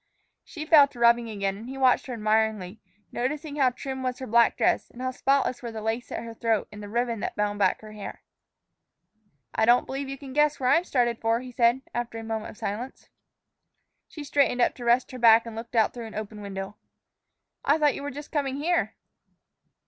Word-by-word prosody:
She 310 -3 -8
fell 305 -3 +7
to 250 - -15
rubbing 235 0 +4
again, 200 -2 -2
and 225 +4 -9
he 270 - -7
watched 260 -1 +3
her 255 - -4
admiringly, 215 -2 0 0.3
noticing 290 +4 -3
how 265 -3 +4
trim 265 +1 -6
was 255 -1 -2
her 260 - -6
black 235 0 +3
dress, - - +1
and 245 - -15
how 255 0 -2
spotless 270 -1 +1
were 235 -2 -5
the 220 - -6
lace 225 +3 -3
at - - -4
her 230 0 -8
throat 225 -2 0
and 210 0 -10
the 205 - -8
ribbon 235 0 -1
that - - -4
bound 205 0 -1
back - - +2
her 215 -1 -11
hair. 210 -1 -8 1.3
"I - - +2
don't 240 +2 +5
believe 270 0 -4
you 275 - -5
can 270 -1 -10
guess 300 +1 +2
where 255 -1 +2
I'm 345 - +4
started 240 -5 +1
for," 225 +1 +2
he 255 0 -9
said, 240 +2 +2
after 240 -1 -3
a 225 - -6
moment 220 -1 -4
of - - -12
silence. 225 +4 -5 1.0
She 300 - -9
straightened 280 -3 +1
up 240 - +3
to 245 - -7
rest 240 +2 +3
her 255 - -8
back 230 -1 +6
and 230 -1 -8
looked 230 +2 -8
out 220 -2 +3
through 235 -2 -7
an 220 - -11
open 215 0 -6
window. 195 0 -6 0.9
"I 290 +3 +3
thought 295 -2 +3
you - - -6
were 285 - -4
just 290 +2 -9
coming 280 -3 -1
here." 335 +5 0
240 Hz, 215 wpm, -26 LUFS, 220-270 Hz, 1.3 s, fell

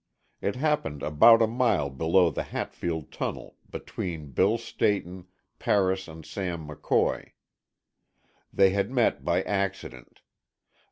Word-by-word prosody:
It 100 - -1
happened 125 - -1
about 115 +10 +6
a - - +3
mile 115 - +1
below 80 +5 +3
the - - -3
Hatfield 80 -4 -4
tunnel, - - -5
between 80 -6 -6
Bill - - +2
Stayton, 95 -3 -2 0.3
Paris 95 -1 +1
and 80 -1 -11
Sam 85 -5 -5
McCoy. 75 - -1 1.2
They 95 -1 +4
had 100 +1 0
met 125 -2 +1
by 90 +2 +1
accident. 100 -10 -4
95 Hz, 115 wpm, -27 LUFS, 80-100 Hz, 1.2 s, about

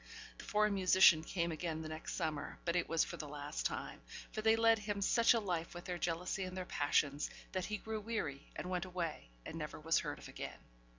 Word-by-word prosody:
The - - -8
foreign 210 0 +3
musician 185 -4 +6
came 170 0 -1
again 160 0 -3
the - - -5
next 155 0 -5
summer, 150 -2 -2
but 170 0 +1
it 175 - +1
was 165 -1 +3
for - - -5
the 150 - -5
last 145 +1 -2
time; - - -6 0.3
for 215 - -3
they 220 +1 +5
led 225 0 +5
him 205 -1 -2
such 230 +4 +5
a - - +3
life 175 -5 -2
with 175 - -7
their 180 -1 -3
jealousy 175 +3 -1
and 185 0 -5
their 185 - -3
passions, 145 -2 +1 0.2
that 185 -2 -1
he 210 - -2
grew 220 0 -4
weary, 205 -11 -3
and 180 - -4
went 180 0 0
away, 170 - -4 0.2
and 165 - -5
never 150 0 -5
was 165 +2 +3
heard - - -4
of - - -10
again. - - -6
175 Hz, 225 wpm, -36 LUFS, 160-200 Hz, 0.3 s, musician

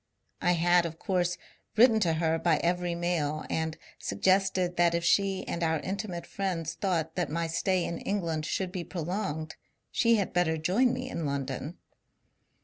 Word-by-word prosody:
I 175 -1 +3
had 175 0 +4
of 165 0 -9
course 180 -1 0 0.4
written 225 0 +6
to 170 -6 +2
her 160 0 +1
by 165 -1 +3
every 175 0 0
mail, 165 -3 -1
and 160 0 -1 0.2
suggested 185 -2 +1
that 170 -1 +3
if 170 - -1
she 195 +1 +2
and 170 - -3
our 160 -1 +1
intimate 190 -3 -4
friends 180 -5 -3
thought 165 -5 -1
that 180 -2 -1
my 165 +2 -1
stay 175 +2 0
in 170 - -4
England 165 -6 -2
should 185 +1 -1
be 180 -2 -4
prolonged, 165 -3 -4 0.3
she 230 0 +4
had 200 -4 -1
better 170 -3 +2
join 195 +11 +2
me 255 +1 -3
in 165 - -3
London. 140 +3 -3
175 Hz, 165 wpm, -29 LUFS, 160-190 Hz, 0.4 s, written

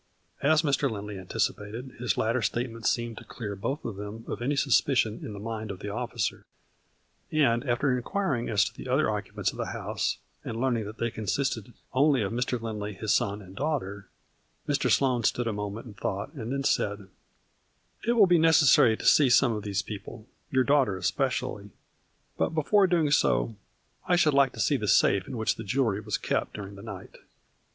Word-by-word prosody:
'' - - -35
As 155 +3 +4
Mr. 140 -2 +2
Lindley 105 -2 -6
anticipated, 105 +6 -3
his 125 -1 0
latter 115 +3 +1
state, 120 +3 -1
ment 115 0 -4
seemed 120 -2 -1
to - - -12
clear 105 -4 -6
both 125 +10 -4
of 110 -4 -4
them 105 +3 -7
of 105 - -5
any 140 +4 0
suspicion 130 -5 +2
in 105 - -6
the 100 - -7
mind 110 0 -5
of 100 - -5
the 105 - -6
officer, 120 0 -3 0.9
and, 125 -6 +3
after 125 +1 +1
nquiring 145 - -1
as 100 -2 +4
to - - -5
the - - -9
other - - +2
occupants - - -2
of - - -12
the - - -3
house, - - -2 0.3
and 115 - -5
learning 120 -4 0
that 110 +2 -8
they 115 0 -1
consisted 110 +1 -2 0.2
only 135 -2 +3
of 100 - -2
Mr. 125 +1 -1
Lindley, 105 -2 -4
his 110 +2 0
son 100 +1 0
and 95 0 -13
daughter, 105 - -3 0.6
Mr. 145 0 +1
Sloane 125 -4 +2
stood 120 +3 +1
a 115 - -1
moment 105 +2 -5
in 115 - -10
thought 100 - -4
and 120 -5 -5
then 140 0 -1
said: 100 -6 0 0.5
" - - -39
It 235 - +4
will 220 -4 +6
be 175 -2 +4
necessary 150 -8 +6
to - - -8
see 145 -4 +6
some 120 +1 +5
of 105 - -3
these 100 -1 -2
people, 110 +1 -8 0.2
your 130 -1 +3
daughter 135 -8 +2
especially, 120 +1 -1 0.7
but, - - 0
before 190 +6 +4
doing 165 -5 +2
so, 115 -5 +2 0.5
I 180 - +4
should 160 -4 +3
like 140 -2 +4
to 115 - -10
see 140 +5 +2
the 105 -4 -3
safe 100 0 +4
in - - -5
which 110 - 0
the 115 - -6
jewelry 115 -2 0
was 105 -1 -2
kept - - -2
during 100 -1 -7
the 100 - -11
night." 100 -3 -9
115 Hz, 200 wpm, -28 LUFS, 105-135 Hz, 0.9 s, will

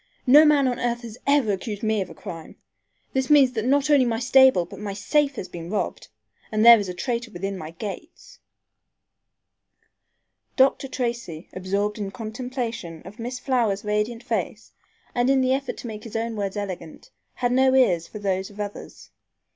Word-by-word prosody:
No 290 +4 +8
man 290 -3 +4
on 250 -1 -1
earth 240 0 -1
has 230 0 -9
ever 280 -6 +3
accused 205 +2 -4
me 220 -1 +1
of 185 - -4
a 165 - -11
crime. 165 -4 -9 0.6
This 265 -1 0
means 285 -4 +6
that 225 -3 -3
not 285 +3 +2
only 285 -3 +6
my 235 -2 0
stable 255 -5 +5
but - - -11
my 205 -1 -4
safe 280 +8 +1
has 190 - -5
been 170 -1 -8
robbed, 210 +1 -3 0.4
and 215 +1 +2
there 235 -1 +10
is 200 -2 -4
a - - -4
traitor 235 +4 -3
within 195 0 -4
my 155 -4 -7
gates." 205 - -9 2.2
Dr. 270 0 +3
Tracy, 235 -11 -4
absorbed 200 +3 -2
in 200 -2 -3
contemplation 230 - -5
of 205 +5 -12
Miss 245 +2 -4
Flower's 235 -6 0
radiant 210 +3 -1
face, 220 -2 -3 0.4
and 245 +1 +1
in 270 0 +4
the 260 0 +2
effort 270 0 -3
to - - -9
make 215 -2 -7
his 225 - -10
own 225 0 -2
words 200 -1 -3
eloquent, 195 - -7 0.2
had 245 -1 0
no 260 +1 +4
ears 180 -11 +3
for - - -9
those 190 -2 -2
of 205 0 -15
others. 205 -1 -7
225 Hz, 180 wpm, -24 LUFS, 200-255 Hz, 2.2 s, there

